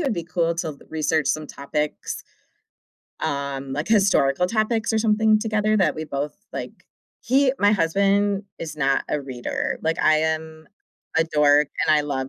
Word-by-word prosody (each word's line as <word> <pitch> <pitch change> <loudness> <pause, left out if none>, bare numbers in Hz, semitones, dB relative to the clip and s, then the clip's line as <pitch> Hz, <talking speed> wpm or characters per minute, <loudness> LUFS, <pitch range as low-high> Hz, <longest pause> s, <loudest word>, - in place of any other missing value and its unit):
it 315 - -1
would 265 - +1
be 170 -3 -4
cool 170 -1 0
to 155 -4 -4
research 155 -1 0
some 155 -1 -1
topics, 150 +2 -4 1.0
um, 140 -1 -3
like 150 +3 -3
historical 190 -7 +3
topics, 225 +2 0
or 220 - +2
something, 215 0 +3
together 215 -1 +1
that 195 - +2
we 155 0 -5
both 145 0 -4 0.2
like. - - -5 0.5
He 265 +1 +3
my 205 +1 +4
husband 200 +2 +2
is 155 -2 -6
not 135 -2 +1
a 150 - -1
reader. 130 -3 -3
Like, 160 +1 0
I 155 0 +5
am 160 0 -3 0.5
a 165 - +4
dork, 150 -2 +3 0.2
and 155 -1 +5
I 150 - +2
love 135 -2 -3
160 Hz, 165 wpm, -23 LUFS, 150-205 Hz, 1.0 s, I